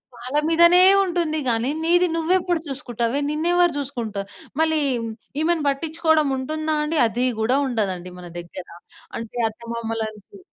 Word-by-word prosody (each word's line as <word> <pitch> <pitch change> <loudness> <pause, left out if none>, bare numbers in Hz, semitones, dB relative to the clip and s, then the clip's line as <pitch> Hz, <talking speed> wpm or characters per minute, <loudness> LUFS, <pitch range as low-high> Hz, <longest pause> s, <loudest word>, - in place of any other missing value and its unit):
వాళ్ళ 250 +4 -4
మీదనే 340 +2 +6 0.2
ఉంటుంది 340 -4 -1
గానీ, 230 +2 0
నీది 350 +2 +4
నువ్వెప్పుడు 350 +1 +1
చూసుకుటావే? 250 -2 -2
నిన్నెవరు 345 +3 +2
చూసుకుంటా 240 -7 -4 0.4
మళ్ళీ 315 -1 +2 0.6
ఈమెను 325 -1 +1
పట్టిచ్చుకోడం 315 +1 +1
ఉంటుందా 310 +4 -2
అండి? 305 +1 -1
అది 240 +3 -1
గూడా 235 +5 +2
ఉండదండి 190 -7 -2
మన 175 - -9
దగ్గర. 175 +1 -9 0.5
అంటే, 230 +1 -7
అత్తమామలని 225 -1 -5
చు 405 - -14
285 Hz, 125 wpm, -22 LUFS, 230-325 Hz, 0.6 s, మీదనే